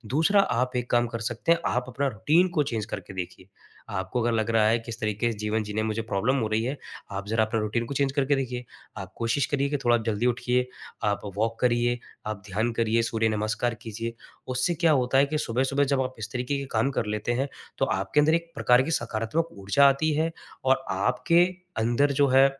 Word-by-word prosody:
दूसरा 200 +6 +5
आप 125 -7 0
एक 125 0 -3
काम 120 0 +3
कर 115 0 -5
सकते 120 +6 -1
हैं, 170 - +4
आप 125 0 0
अपना 135 +3 -1
रूटीन 155 - +2
को 150 - +4
चेंज़ 115 -5 -3
करके 100 - -6
देखिए। 95 0 -6 0.4
आपको 100 +4 -2
अगर 120 +1 +1
लग 110 0 0
रहा 110 -1 +4
है 115 +2 +3
कि 115 - -12
इस 115 - -6
तरीके 105 +2 0
से 110 - -7
जीवन 105 +1 0
जीने 105 +1 -2
में 110 - -1
मुझे 110 +1 -1
प्रॉब्लम 115 +5 0
हो 110 - 0
रही 110 +1 +1
है, 135 +4 -2 0.3
आप 100 +1 -5
ज़रा 110 +1 +2
अपना 110 +1 -1
रूटीन 115 +2 -1
को 140 - -5
चेंज़ 135 -1 +1
करके 140 0 +2
देखिए। 125 -2 -3 0.3
आप 95 -2 -7
कोशिश 115 +4 +1
करिए 140 0 +1
कि 145 - 0
थोड़ा 120 0 +5
जल्दी 110 +1 0
उठिए, 125 +1 +1 0.4
आप 105 -1 +1 0.2
वॉक 115 +1 0
करिये, 120 0 +2 0.3
आप 105 -2 -4
ध्यान 110 +5 0
करिए, 115 0 +2
सूर्य 115 -1 +1
नमस्कार 110 +2 -1
कीजिए। 115 +1 -5 0.3
उससे 130 +7 0
क्या 165 0 +3
होता 130 -2 +2
है 140 - +5
कि 155 +2 -1
सुबह-सुबह 135 +3 +1
जब 135 -1 +1
आप 130 0 -3
इस 110 +2 -6
तरीके 125 +3 -1
के 140 - -4
काम 115 +4 +2
कर 120 - -1
लेते 105 +3 -1
हैं, 135 +3 -1 0.3
तो - - +3
आपके 95 +9 0
अंदर 155 +2 +3
एक 170 0 -3
प्रकार 125 +1 +4
की 165 - -3
सकारात्मक 120 +5 -1
ऊर्जा 100 +9 +4
आती 145 +3 +1
है 160 +2 +1 0.3
और 135 0 +3
आपके 125 - +3 0.3
अंदर 120 +6 +2
जो 140 0 +3
है, 135 +1 +6
120 Hz, 225 wpm, -26 LUFS, 110-135 Hz, 0.4 s, है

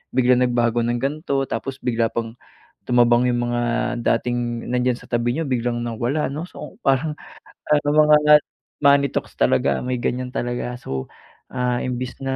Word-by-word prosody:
biglang 125 -1 +4
nagbago 120 -1 +1
ng 120 0 0
gan'to, 140 0 -1
tapos 130 +4 -4
bigla 115 -2 +1
pang 115 0 -5 0.5
tumabang 120 0 +4
yung 120 0 0
mga 120 0 0 0.4
dating 120 0 -1
nandiyan 125 0 +1
sa - - -15
tabi 120 +1 0
niyo 165 - -1
biglang 120 -2 -1
nawala 120 +5 -2
no? 160 +5 -5
So 205 - -10
parang 135 +3 +2 0.7
mga 150 0 +6 0.4
money 140 0 +5
talks - - -4
talaga - - +2
may 125 -1 -2
ganyan 125 +1 -2
talaga. 120 0 -3
So, 65 -1 -4 0.4
ah, 125 -1 -1
imbes 125 0 -4
na 135 0 -1
125 Hz, 150 wpm, -22 LUFS, 120-135 Hz, 0.7 s, mga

